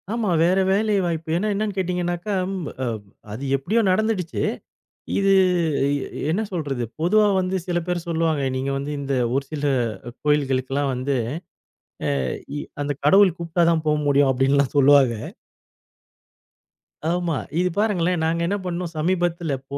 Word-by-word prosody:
ஆமா. 230 -4 -1
வேற 180 +3 +3
வேலை 210 +2 +2
வாய்ப்பு. 165 -2 -3
ஏன்னா 205 +4 -1
என்னன்னு 205 0 -2
கேட்டீங்கன்னாக்கா, 180 +1 -1 0.2
ம் 180 -5 -4 0.2
அ - - 0 0.5
அது 120 +6 -6
எப்படியோ 200 +12 +1
நடந்துடுச்சு, 190 -3 0 0.8
இது. 195 0 +3 0.6
இ 140 0 -4
என்ன 190 +7 0
சொல்றது? 145 -8 -2 0.2
பொதுவா 210 +6 +4
வந்து 185 +1 -1
சில 175 -1 0
பேரு 180 -1 -1
சொல்லுவாங்க. 160 -3 0
நீங்க 135 +1 -2
வந்து 140 +2 -4
இந்த 140 -1 -2 0.2
ஒரு 135 +1 0
சில 150 -1 -3 0.6
கோயில்களுக்கெல்லாம் 135 -1 +1
வந்து, 130 +2 -1 1.1
அ - - -1 0.3
இ - - -2 0.2
அந்த 145 0 -1
கடவுள் 190 +2 +6
கூப்ட்டா 170 +1 0
தான் 160 -2 0
போ 150 - +4
முடியும், 140 -1 +4
அப்படின்லாம் 135 +1 +2
சொல்லுவாங்க. 140 -3 +6 2.0
ஆமா. 175 -2 0 0.2
இது 180 0 +2
பாருங்களேன்! 180 -5 +1
நாங்க 165 +1 0
என்ன 200 +3 0
பண்ணோம்? 175 -1 -3
சமீபத்தில 170 -1 0 0.2
போ 140 - -4
170 Hz, 140 wpm, -23 LUFS, 140-185 Hz, 2.0 s, கடவுள்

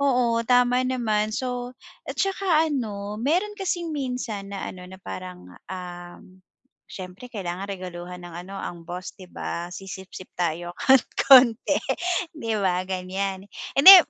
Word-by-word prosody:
Oo, 245 -4 +3
tama 250 +1 +4
naman. 215 -4 +1
So 250 0 -3 0.3
at - - -4
tsaka 375 -5 +2
ano, 210 -6 -3
meron 360 - +1
kasing 350 -3 -1
minsan 250 -8 -3
na 195 - -4
ano, 180 -1 -8
na 190 +1 -11
parang, 90 -1 -7 0.2
um, 175 -1 -7 0.6
siyempre 185 +5 -8
kailangan 195 -5 -4
regaluhan 180 -2 -6
ng 175 - -8 0.2
ano, 195 - -8
ang 170 -1 -6
boss, 180 +1 -5
'di 185 - -10
ba, 170 -1 -4
sisipsip 190 -1 -8
tayo 175 0 -1
kahit 265 -2 +6 0.2
konti, 250 -4 +7 0.6
'di 230 -9 -3
ba, 185 -1 +1
ganiyan. 190 +1 -2 0.3
Hindi, 370 +8 +12
200 Hz, 135 wpm, -25 LUFS, 180-255 Hz, 0.6 s, Hindi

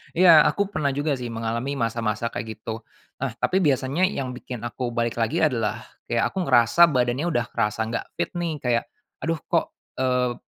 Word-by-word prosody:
Iya, 170 -3 +8
aku 200 -1 +1
pernah 145 -2 +1
juga 145 +2 0
sih 125 -1 -5
mengalami 115 +4 -2
masa-masa 115 -2 -1
kayak 110 - -4
gitu. 110 +1 -6 0.4
Nah 135 - -1
tapi 185 - +2
biasanya 140 +3 +2
yang 135 -9 -3
bikin 125 -3 -7
aku 120 +1 -3
balik 115 0 -1
lagi 115 +8 0
adalah 115 -7 0 0.3
kayak 115 -1 +1
aku 190 -2 -2
ngerasa 120 +6 +4
badannya 125 +3 +1
udah 120 -1 +1
kerasa 110 -1 -1
enggak 115 - -3
fit - - -1
nih, 170 -2 -1
kayak, 120 -2 +1 0.4
"Aduh 165 0 0
kok, - - +1 0.2
eee, 125 -1 +1
125 Hz, 180 wpm, -24 LUFS, 115-145 Hz, 0.4 s, Iya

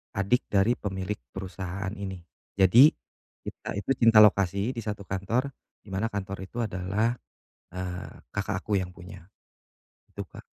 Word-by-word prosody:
adik 100 +5 +1
dari 105 +4 +2
pemilik 95 0 -3 0.2
perusahaan 95 0 -5
ini, 95 -4 -6 0.3
jadi 105 +9 +8 0.6
kita - - -6
itu 100 +6 -2
cinta 115 -2 +8
lokasi 100 +2 +3
di 120 - -5
satu 105 -3 -4
kantor 110 +9 -1 0.3
di 105 - -15
mana 95 +4 0
kantor 100 -2 -4
itu 120 +5 -4
adalah, 100 +2 0 0.6
eee, 90 0 -6 0.2
kakak 100 -1 -1
aku 105 - -2
yang 90 - -5
punya 90 +1 -11 0.9
gitu - - -5
Kak. - - -11
100 Hz, 140 wpm, -27 LUFS, 95-110 Hz, 0.9 s, jadi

